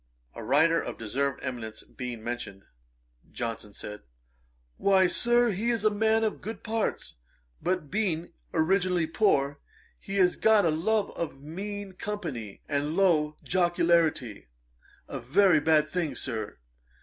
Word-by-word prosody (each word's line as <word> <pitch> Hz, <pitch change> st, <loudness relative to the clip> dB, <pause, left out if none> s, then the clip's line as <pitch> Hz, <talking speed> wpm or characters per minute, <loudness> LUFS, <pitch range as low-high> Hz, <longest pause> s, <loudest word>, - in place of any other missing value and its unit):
] -, -, -41 dB
A -, -, -8 dB
writer 160 Hz, +8 st, +4 dB
of -, -, -6 dB
deserved 135 Hz, +5 st, -2 dB
eminence 115 Hz, -4 st, -5 dB
being 120 Hz, -3 st, -7 dB
mentioned, 110 Hz, -5 st, -5 dB, 0.7 s
Johnson 115 Hz, -3 st, -5 dB
said, 105 Hz, +1 st, -8 dB, 0.8 s
'Why, 190 Hz, -1 st, +4 dB
Sir, 240 Hz, +5 st, +3 dB
he 210 Hz, +5 st, -1 dB
is 230 Hz, -3 st, 0 dB
a 215 Hz, -, +5 dB
man 220 Hz, +1 st, +2 dB
of 220 Hz, -, -1 dB
good 220 Hz, +2 st, -7 dB
parts, 220 Hz, -, -2 dB, 0.4 s
but 180 Hz, -5 st, -1 dB
being 175 Hz, -5 st, -1 dB, 0.2 s
originally 180 Hz, +1 st, +2 dB
poor, 145 Hz, -6 st, +1 dB, 0.4 s
he 195 Hz, -, -6 dB
has 185 Hz, -2 st, +3 dB
got 220 Hz, -3 st, +4 dB
a 165 Hz, -, +3 dB
love 205 Hz, +7 st, 0 dB
of 150 Hz, -5 st, -5 dB
mean 195 Hz, +6 st, -6 dB
company 160 Hz, -, -5 dB
and 145 Hz, +2 st, -1 dB
low 155 Hz, -6 st, +3 dB
jocularity; 170 Hz, -, +1 dB, 0.6 s
a -, -, -5 dB
very 155 Hz, +7 st, +4 dB
bad 155 Hz, 0 st, +3 dB
thing, 170 Hz, -5 st, -1 dB
Sir. 110 Hz, -5 st, -4 dB
165 Hz, 135 wpm, -28 LUFS, 135-200 Hz, 0.8 s, a